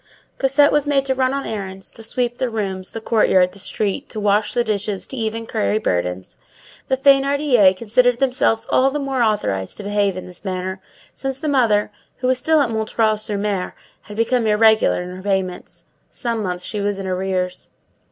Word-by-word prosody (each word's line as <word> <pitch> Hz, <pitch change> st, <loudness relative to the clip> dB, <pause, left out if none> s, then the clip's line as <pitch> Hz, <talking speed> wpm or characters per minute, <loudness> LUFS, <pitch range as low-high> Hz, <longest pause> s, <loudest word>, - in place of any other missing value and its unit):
Cosette 275 Hz, +2 st, +4 dB
was 295 Hz, 0 st, +1 dB
made 275 Hz, -2 st, +2 dB
to 265 Hz, -, +1 dB
run 260 Hz, 0 st, +1 dB
on 275 Hz, 0 st, -3 dB
errands, 195 Hz, -2 st, -5 dB
to 230 Hz, -, -10 dB
sweep 240 Hz, +2 st, -2 dB
the 255 Hz, -, 0 dB
rooms, 195 Hz, -4 st, -3 dB
the 225 Hz, -, -6 dB
courtyard, 190 Hz, -5 st, +3 dB
the 200 Hz, -, -11 dB
street, 205 Hz, +6 st, -3 dB
to 215 Hz, -, -5 dB
wash 210 Hz, 0 st, +2 dB
the 240 Hz, -, +1 dB
dishes, 210 Hz, -3 st, -2 dB
to -, -, -8 dB
even 225 Hz, -1 st, -3 dB
carry 215 Hz, -1 st, 0 dB
burdens. 90 Hz, -, -2 dB, 0.5 s
The 265 Hz, -, +1 dB
Thénardiers 275 Hz, -7 st, +4 dB
considered 235 Hz, +3 st, +2 dB
themselves 250 Hz, -4 st, +1 dB
all 265 Hz, +1 st, +4 dB
the 285 Hz, -, -3 dB
more 275 Hz, -3 st, -2 dB
authorized 105 Hz, -, 0 dB
to 210 Hz, -, -6 dB
behave 200 Hz, -2 st, 0 dB
in 185 Hz, -, -6 dB
this 180 Hz, -1 st, -8 dB
manner, 190 Hz, -1 st, -4 dB, 0.3 s
since 270 Hz, -1 st, -4 dB
the 305 Hz, -, -4 dB
mother, 230 Hz, -8 st, +2 dB, 0.3 s
who 255 Hz, -, -5 dB
was 255 Hz, 0 st, +3 dB
still 315 Hz, +3 st, +3 dB
at 250 Hz, -5 st, 0 dB
M. 220 Hz, 0 st, +1 dB
sur 210 Hz, -1 st, -3 dB
M., 195 Hz, -3 st, -2 dB, 0.3 s
had 210 Hz, -, -11 dB
become 230 Hz, 0 st, +1 dB
irregular 220 Hz, -3 st, +4 dB
in 180 Hz, +1 st, -8 dB
her 185 Hz, -, -9 dB
payments. 190 Hz, -2 st, -3 dB, 0.2 s
Some 235 Hz, -3 st, -3 dB
months 180 Hz, -2 st, -3 dB
she 210 Hz, -, -3 dB
was 205 Hz, 0 st, -1 dB
in 195 Hz, -, -5 dB
arrears. 185 Hz, -1 st, -2 dB
215 Hz, 190 wpm, -20 LUFS, 195-255 Hz, 0.5 s, Cosette